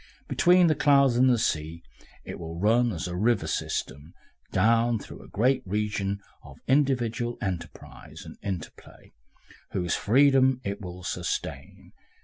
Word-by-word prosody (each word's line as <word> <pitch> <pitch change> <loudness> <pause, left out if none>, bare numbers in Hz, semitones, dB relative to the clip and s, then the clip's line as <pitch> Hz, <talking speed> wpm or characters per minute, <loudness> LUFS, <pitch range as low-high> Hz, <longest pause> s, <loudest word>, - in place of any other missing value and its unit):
Between 180 0 +4
the 160 - +4
clouds 140 -4 +4
and 130 +2 +4
the 125 - +3
sea 80 -5 -2 0.4
it - - -7
will 85 -1 -7
run, 115 +4 +3
as 85 -3 -4
a 90 - -5
river 115 +6 +1
system 75 +4 -4
runs, - - -35
down 115 +3 +3
through - - -11
a - - -14
great 130 +5 +1
region 100 0 -2 0.2
of - - -13
individual 125 -4 +1
enterprise 90 -4 -7
and - - -10
interplay, 95 -5 -8 0.6
whose 90 -3 -1
freedom 130 +2 +3
it 100 +1 -4
will 90 -1 -8
sustain. - - -5
110 Hz, 140 wpm, -26 LUFS, 95-130 Hz, 0.6 s, Between